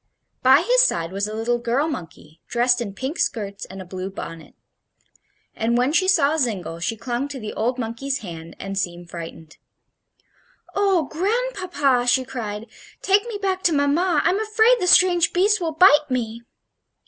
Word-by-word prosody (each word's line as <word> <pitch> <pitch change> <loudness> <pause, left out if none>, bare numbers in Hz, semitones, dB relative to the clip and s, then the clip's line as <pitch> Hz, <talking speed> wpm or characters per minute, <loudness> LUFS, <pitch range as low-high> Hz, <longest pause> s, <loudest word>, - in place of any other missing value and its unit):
By 265 +5 +5
his - - +5
side 165 - +1
was 200 +2 -2
a 215 - -6
little 240 +2 -1
girl 240 +6 0
monkey, 165 - -8
dressed 245 +1 +2
in 200 -4 -5
pink 265 - -5
skirts 200 -5 -2
and 190 +1 -10
a 185 - -8
blue 185 +1 -6
bonnet; 165 -4 -9 1.0
and 235 +2 0
when 250 +4 +1
she 370 +3 +2
saw 315 -5 +3
Zingle 195 - -2
she 200 +7 -2
clung 245 +4 -3
to 285 -2 -7
the 215 -2 -6
old 245 +4 -1
monkey's 255 +4 -3
hand 165 -2 -9
and 195 0 -5
seemed 175 -2 -5
frightened. 165 -2 -9 1.2
"Oh, 390 -4 +2
grandpapa!" 355 - -1
she 260 +1 +3
cried; 220 -5 -5 0.4
"take 405 +3 +3
me 450 -3 -4
back 380 -2 -1
to 340 - +2
mamma; 295 +3 +2
I'm 385 - +2
afraid 440 +3 +3
the 360 - -1
strange 355 -1 +5
beast 405 +3 +2
will 330 -2 -1
bite 305 -3 +5
me." 235 -3 -3
255 Hz, 170 wpm, -22 LUFS, -, 1.2 s, By